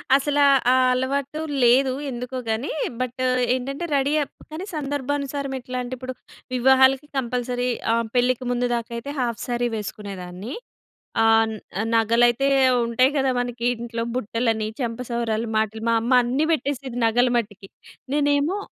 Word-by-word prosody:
అసలా 290 +1 +2 0.3
ఆ - - +5 0.2
అలవాటు 275 +4 -1 0.2
లేదు 255 +2 +5 0.2
ఎందుకో 250 +1 -5
గాని. 220 +6 -1 0.3
బట్ 255 +1 -3 0.3
ఏంటంటే 275 +6 -4
రెడీ 280 +2 +1
అప్ - - -12 0.2
కాని 340 +5 -5
సందర్భానుసారం 280 -1 -2
ఎట్లాంటే 250 0 -5
ఇప్పుడు 255 +1 -6 0.4
వివాహాలకి 265 +2 +4
కంపల్సరీ 245 0 -1 0.2
ఆహ్, 230 0 +1
పెళ్ళికి 250 +1 +2
ముందు 245 0 0
దాకైతే 235 +3 -5
హాఫ్ 240 -2 -1
స్యారీ 240 -1 -1
వేసుకునేదాన్ని. 200 - -6 0.7
ఆహ్, 225 0 +5
న్ - - -6 0.4
నగలైతే 235 +4 +3 0.4
ఉంటాయి 255 +3 +3
గదా! 265 -1 +2
మనకి 245 -1 -2
ఇంట్లో 230 0 -4
బుట్టలని, 225 -2 -1
చెంపసౌరాలు, 235 -1 -2
మాటీలు 220 0 -1
మా 230 - +3
అమ్మ 235 - -2
అన్నీ 265 +6 0
పెట్టేసేది 275 -4 -3
నగలు 245 +2 +3
మట్టికి. 205 -4 -4 0.5
నేనేమో 290 +5 +2
245 Hz, 130 wpm, -23 LUFS, 230-270 Hz, 0.7 s, ఆ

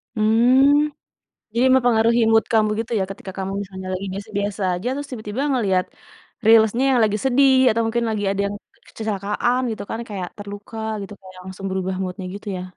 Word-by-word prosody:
Hmm, 260 +7 +4 0.6
jadi 245 +2 +4
mempengaruhi 235 -2 +3
mood 225 0 +4
kamu 215 -1 +4
gitu 230 - -4
ya - - +1
ketika 195 -1 -9
kamu 190 0 -3
misalnya 190 -1 -8
lagi 185 +2 -4
biasa-biasa 205 0 -4
aja, 180 +7 -5
terus 285 +1 -6
tiba-tiba 220 0 -4
ngelihat 195 -8 +1 0.6
Reels-nya 225 +2 +5
yang 255 - +3
lagi 210 -1 +1
sedih, 265 +1 +4 0.2
atau 230 +1 0
mungkin 235 +1 0
lagi 215 -2 -2
ada 200 0 -1
yang 200 - -5 0.2
ke - - -31
kecelakaan 215 +3 -1
gitu 220 - -5
kan 225 - -3
kayak 190 -4 -5
terluka 205 +2 -9 0.2
gitu, 200 +1 -8
kayak 185 -1 -13
langsung 190 +1 -8
berubah 190 0 -2
mood-nya 185 0 -5
gitu 205 +1 -10
ya? 180 - -5
215 Hz, 180 wpm, -21 LUFS, 195-235 Hz, 0.6 s, Reels-nya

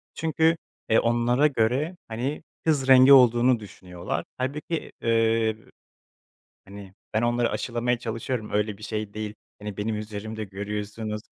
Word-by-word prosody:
Çünkü, 160 +1 +2 0.3
eee, 110 - +5
onlara 120 +4 +3
göre, 135 +6 0
hani, 125 +7 -3 0.2
kız 145 -4 +2
rengi 130 +1 +8
olduğunu 120 -1 +6
düşünüyorlar. 90 -5 -6
Hâlbuki, 150 +5 -3
eee, 115 -1 +2 1.1
hani, 100 -1 -11 0.2
ben 110 - +2
onları 120 0 +1
aşılamaya 120 0 -1
çalışıyorum, 115 0 -4
öyle 105 -1 0
bir - - -15
şey 105 -1 -4
değil, 105 0 -5 0.3
hani, 105 -2 -6
benim 105 +1 -2
üzerimde 110 +1 -5
görüyorsunuz, 105 +2 -5
115 Hz, 125 wpm, -25 LUFS, 105-125 Hz, 1.1 s, rengi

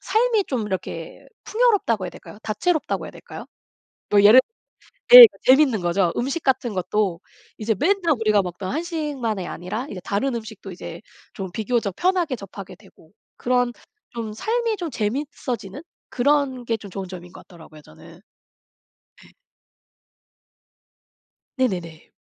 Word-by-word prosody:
삶이 450 -2 +1
좀 245 -9 -3
이렇게 205 - -6 0.2
풍요롭다고 410 - +1
해야 - - -6
될까요? 205 - -13
다채롭다고 310 - -1
해야 - - -8
될까요? - - -11 0.6
뭐 205 -1 +4
예를 210 +5 +8 0.8
예 - - +15
그 - - -21
재밌는 260 -5 +4
거죠. 175 0 +1
음식 275 +6 -2
같은 250 -5 0
것도 185 -1 -1 0.4
이제 220 0 -1
맨날 365 -2 +2
우리가 215 -2 +3
먹던 185 +1 -6
한식만이 290 - -3
아니라 205 - -5
이제 185 - -7
다른 240 +6 -1
음식도 220 -3 -8
이제 180 - -9 0.3
좀 190 -2 -6
비교적 220 -1 -2
편하게 355 -7 0
접하게 195 -2 -10
되고 190 -5 -21 0.3
그런 245 0 +1 0.4
좀 225 -3 -6
삶이 460 - -1
좀 345 -5 -5
재밌어지는 235 -1 -4 0.3
그런 265 -1 0
게 230 - 0
좀 205 -3 -12
좋은 190 0 -6
점인 180 -1 -10
것 - - -14
같더라고요 160 -4 -15
저는. - - -16 1.0
예. - - -20 2.3
네네네. 175 -10 -3
225 Hz, 295 characters per minute, -22 LUFS, 195-290 Hz, 2.3 s, 예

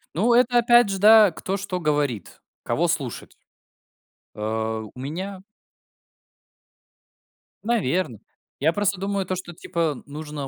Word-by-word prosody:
Ну, 225 +8 +2
это 245 0 +4
опять 240 -2 +5
же, 195 -1 -2
да, 215 -1 +7
кто 185 +4 -4
что 185 -2 -4
говорит, 145 - -2 0.2
кого - - 0
слушать. - - -4 1.0
Э, 110 +1 -3
у - - -11
меня 185 +8 -5 2.2
Наверно. 185 - -1 0.4
Я 160 +4 +2
просто 205 -1 0
думаю, 195 0 -2
то, 185 - -2
что, 175 -1 -8
типа, 160 -3 -3
нужно 150 -1 -7
180 Hz, 120 wpm, -23 LUFS, 145-200 Hz, 2.2 s, да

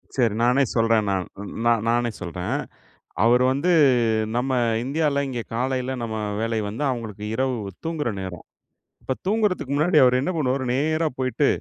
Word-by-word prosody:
சரி 120 -5 +2
நானே 125 +3 +4
சொல்றேன். 115 -2 +3
நான் 95 -2 0 0.4
நான் 115 -2 +3
நானே 120 0 +1
சொல்றேன். 90 0 -3 0.7
அவர் 120 +2 +5
வந்து 145 +7 0 0.7
நம்ம 125 +2 0 0.3
இந்தியால 140 +1 0
இங்க 125 -3 -3
காலையில 130 +1 -1
நம்ம 110 -1 -3 0.2
வேலை 115 0 -1
வந்து 110 +7 -5
அவங்களுக்கு 110 -5 -5
இரவு 130 +1 0 0.3
தூங்குற 160 -5 -2
நேரம். 95 -3 -7 0.6
இப்ப 130 - -2
தூங்குறதுக்கு 200 - 0
முன்னாடி 155 +3 +2
அவர் 125 0 +4
என்ன 140 - -1
பண்ணுவாரு 135 -3 0
நேரா 155 +4 +1
போயிட்டு 130 +2 +1
125 Hz, 145 wpm, -23 LUFS, 115-140 Hz, 0.7 s, அவர்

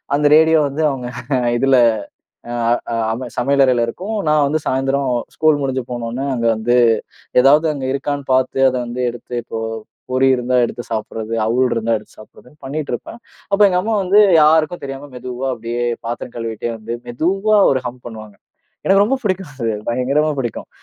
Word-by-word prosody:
அந்த 145 0 +3
ரேடியோ 160 0 +5
வந்து 150 +3 -3
அவங்க 125 -3 -5 0.5
இதுல 135 +1 +3 0.8
அ - - -4 0.4
அ - - 0 0.2
அம 125 +1 -6
சமையலறையில 130 -2 +3
இருக்கும். 200 - -5
நான் 150 -2 +3
வந்து 155 +1 0
சாய்ந்தரம் 135 0 0 0.3
ஸ்கூல் 155 -2 +3
முடிஞ்சு 130 -2 -2
போன 120 -1 -4
உடனே, 135 +4 -3
அங்க 115 0 -1
வந்து 120 +3 +1 0.7
எதாவது 150 +4 +5
அங்க 135 -2 -4
இருக்கான்னு 140 0 -3
பார்த்து 130 0 +1
அத 130 - -3
வந்து 125 +1 -4
எடுத்து, 120 +1 -9
இப்போ 115 -1 -5 0.5
பொரி 130 +1 +3
இருந்தா 125 0 0
எடுத்து 120 +1 -5
சாப்டுறது, 110 0 -4
அவுல் 125 +3 +2
இருந்தா 115 0 0
எடுத்து 105 - -19
சாப்பிடுறதுன்னு 125 +6 -17
பண்ணிட்டு 145 +2 -4
இருப்பேன். 230 - -8 0.3
அப்ப 200 - +3
எங்க 180 - +1
அம்மா 225 +1 -1
வந்து 195 +3 +4 0.2
யாருக்கும் 155 +2 +3
தெரியாம 135 +1 -7
மெதுவா 125 +1 -5
அப்டியே 120 +1 -4 0.2
பாத்திரம் 120 +1 -5
கழுவிக்கிட்டே 115 0 -4
வந்து, 110 +1 -7 0.2
மெதுவா 195 - +1 0.2
ஒரு 130 - 0
ஹம் 125 +1 -6
பண்ணுவாங்க. 110 -3 -10 0.5
எனக்கு 195 +1 +5
ரொம்பப் 265 +3 -1
புடிக்கும், 185 -4 -2
அது 120 -3 -4 0.2
பயங்கரமா 135 +6 +1
புடிக்கும். 120 -3 -4
130 Hz, 165 wpm, -18 LUFS, 120-150 Hz, 0.8 s, ரேடியோ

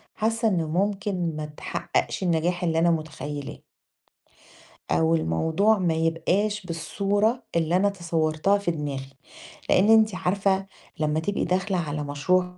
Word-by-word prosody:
حاسة 225 +1 0
إنه 175 -6 +1
ممكن 185 -1 -1
ما 155 0 -4
تحققش 150 +4 -3
النجاح 175 +1 0
اللي 165 -2 +1
أنا 170 +1 +4
متخيلاه. 150 -3 -4 1.3
أو 80 0 +3
الموضوع 160 - +2
ما 175 -4 +1
يبقاش 180 +6 0
بالصورة 205 +7 0
اللي 165 +1 +2
أنا 200 +2 +3
تصورتها 170 0 0
في 200 -4 -1
دماغي، 140 -4 -4 0.6
لأن 195 +4 +4
أنتِ 220 -3 +5
عارفة 190 +1 0 0.3
لما 155 0 +1
تبقي 200 +6 -1
داخلة 185 +2 0
على 150 -3 -2
مشروع 180 +6 0
175 Hz, 130 wpm, -25 LUFS, 155-200 Hz, 1.3 s, أنتِ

